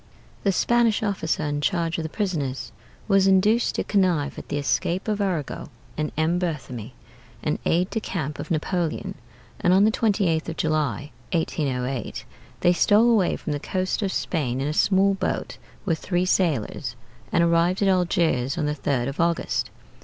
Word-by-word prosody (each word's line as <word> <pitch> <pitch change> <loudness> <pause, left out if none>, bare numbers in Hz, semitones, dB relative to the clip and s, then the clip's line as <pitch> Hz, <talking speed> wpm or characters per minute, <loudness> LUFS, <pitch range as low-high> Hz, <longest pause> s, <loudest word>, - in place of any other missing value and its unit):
The 200 - +2
Spanish 235 +2 +2
officer 190 -7 -1
in 145 0 -1
charge 170 0 0
of - - -2
the 160 - -4
prisoners 155 - -2 0.4
was 195 -2 +4
induced 210 +5 +3
to - - 0
connive 180 -8 +1
at - - -11
the - - -1
escape 170 +6 0
of 210 -1 0
Arago 175 -10 -2 0.3
and 150 0 -2
M. 165 +3 +2
Berthémie 130 - -4 0.5
(an - - -1
aide 180 +3 +2
de 225 - 0
camp 160 -9 -4
of - - -6
Napoleon); 170 0 -1 0.5
and 180 - +3
on 195 - +5
the 220 - +4
28th 195 -8 +1
of 165 - -6
July, 155 -2 -1 0.2
1808, 135 -7 -2 0.4
they 175 - +5
stole 215 +6 +4
away 205 -6 +3
from 150 - -4
the 145 - -2
coast 185 +6 -2
of 195 -2 0
Spain 135 -11 -1
in 135 - -1
a 150 - -1
small 195 +4 +3
boat 195 - -3 0.3
with 165 -5 0
three 180 -1 0
sailors, 145 - 0 0.4
and 170 - +3
arrived 170 +3 +2
at - - +3
Algiers 170 -8 +1
on 155 - 0
the 150 - 0
3d 135 -4 -1
of 140 - -5
August. 170 0 0
170 Hz, 170 wpm, -24 LUFS, 150-190 Hz, 0.5 s, on